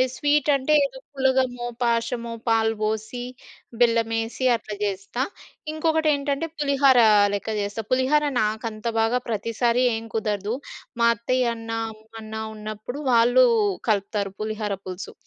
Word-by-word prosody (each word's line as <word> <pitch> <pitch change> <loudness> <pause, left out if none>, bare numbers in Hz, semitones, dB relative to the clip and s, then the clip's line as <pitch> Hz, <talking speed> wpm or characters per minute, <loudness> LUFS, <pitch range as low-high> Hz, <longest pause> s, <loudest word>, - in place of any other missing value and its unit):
Sweet 290 +1 +2
అంటే 275 +3 +1
ఏదో 265 -1 -7
పులగమో, 260 -2 +1 0.2
పాశమో 235 0 -1 0.2
పాలు 225 0 +2
బోసి, 220 +3 -2 0.6
బెల్లమేసి 230 +1 +1
అట్లా 215 -2 -6
చేస్తా. 200 +5 -2 0.5
ఇంకొకటేంటంటే 310 -2 +1
పులిహోర 275 -3 +4 0.3
లెక్క 205 +2 -3
చేస్తా. 205 +2 -4
పులిహోర 260 +4 +3 0.2
నాకంత 215 +1 -3
బాగా 225 +3 +2
ప్రతిసారి 230 +3 +1
ఏం 225 0 -5
కుదరదు. 210 0 -1 0.5
మా 235 - +5
అత్తయ్యన్నా, 230 -1 -1 0.2
అమ్మన్నా 220 0 -9
ఉన్నప్పుడు 215 +6 -6
వాళ్ళు 245 +2 +5 0.4
కలుపుతారు 200 -1 0
పులిహోర 215 -1 -2
పులుసు. 185 +1 -7
230 Hz, 110 wpm, -24 LUFS, 215-260 Hz, 0.6 s, మా